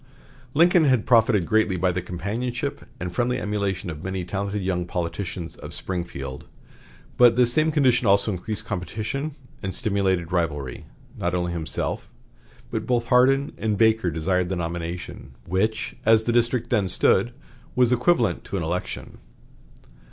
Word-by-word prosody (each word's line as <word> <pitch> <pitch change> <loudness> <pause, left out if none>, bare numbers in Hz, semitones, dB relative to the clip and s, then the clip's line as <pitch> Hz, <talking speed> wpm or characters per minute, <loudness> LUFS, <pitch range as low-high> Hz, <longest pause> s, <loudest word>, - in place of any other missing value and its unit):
Lincoln 170 +1 +5
had 130 -6 +3
profited 110 -6 +4
greatly 110 -1 +2
by 90 +1 +2
the 90 +1 -2
companionship 100 +8 -4
and 90 0 -4
friendly 125 +6 0
emulation 100 -3 -2
of 75 - -7
the - - -11
many 95 -1 -3
talented 100 +2 -3
young 90 -2 -1
politicians 85 0 -4
of - - -8
Springfield, 85 -8 -5 0.7
but 120 -2 +7
this 120 -1 +4
same 155 +2 +3
condition 130 -6 +3
also 100 +2 +4
increased 105 +4 -4
competition 110 - -4 0.3
and 95 0 -4
stimulated 95 -6 0
rivalry. 75 -8 -2 0.3
Not 90 +1 0
only 90 -1 -1
himself, 85 -2 -3 0.6
but - - -3
both 120 -2 0
Hardin 135 +2 +4
and 110 -2 0
Baker 110 -3 +3
desired 90 +3 0
the 95 - -1
nomination, 85 -5 -5
which, 105 +5 -1
as 110 0 +5
the 120 - 0
district 120 0 +1
then 105 -6 +2
stood, 95 +4 +3 0.4
was 125 -1 +4
equivalent 125 0 +2
to 100 - -3
an 90 - -2
election. 85 +3 -4
100 Hz, 150 wpm, -24 LUFS, 90-120 Hz, 0.7 s, but